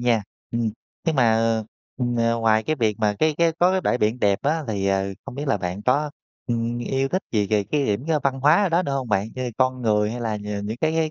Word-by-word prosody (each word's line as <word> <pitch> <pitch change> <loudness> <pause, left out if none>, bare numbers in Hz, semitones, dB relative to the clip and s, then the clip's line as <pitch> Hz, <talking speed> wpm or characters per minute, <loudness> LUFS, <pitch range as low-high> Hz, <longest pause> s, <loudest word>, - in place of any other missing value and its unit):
nha, 120 -3 +2 0.3
ừm, 115 -1 0 0.4
nhưng 160 -3 +1
mà, 120 -3 +4
ờ, 115 0 +2
ờ, 110 - -4 0.3
ừm, 120 -1 -1
ờ, 115 0 +2
ngoài 110 -1 +3
cái 155 +5 -1
việc 110 -5 0
mà 105 -1 +1
cái 155 -1 +2
cái 170 -1 +3
có 180 +1 +5
cái 190 - +1
bãi 125 - +1
biển 110 +4 +1
đẹp 100 -1 +3
á 155 +2 0
thì, 100 -2 -1
ờ, 95 0 +1 0.2
không 135 -2 -8
biết 145 +1 -4
là 135 - +3
bạn 90 +1 -4
có, 145 +5 +1 0.4
ừm, 120 0 -1
yêu 135 +2 -1
thích 185 +5 -1
gì 105 -3 +2
về 105 0 +1
cái 145 +3 0
điểm 105 +6 -1 0.2
văn 135 -1 0
hóa 150 +9 +5
ở 195 - +2
đó 170 +2 +2
nữa 140 -5 -3
hông 130 -3 -2
bạn, 100 +1 +1
như 130 - -4
là 125 - -2
con 130 -1 +1
người 105 -2 +2
hay 120 - -5
là 110 -2 -1
nh 105 - -8 0.2
những 110 +2 -3
cái 155 0 +2
cái 160 -1 +1
120 Hz, 275 wpm, -23 LUFS, 110-140 Hz, 0.4 s, có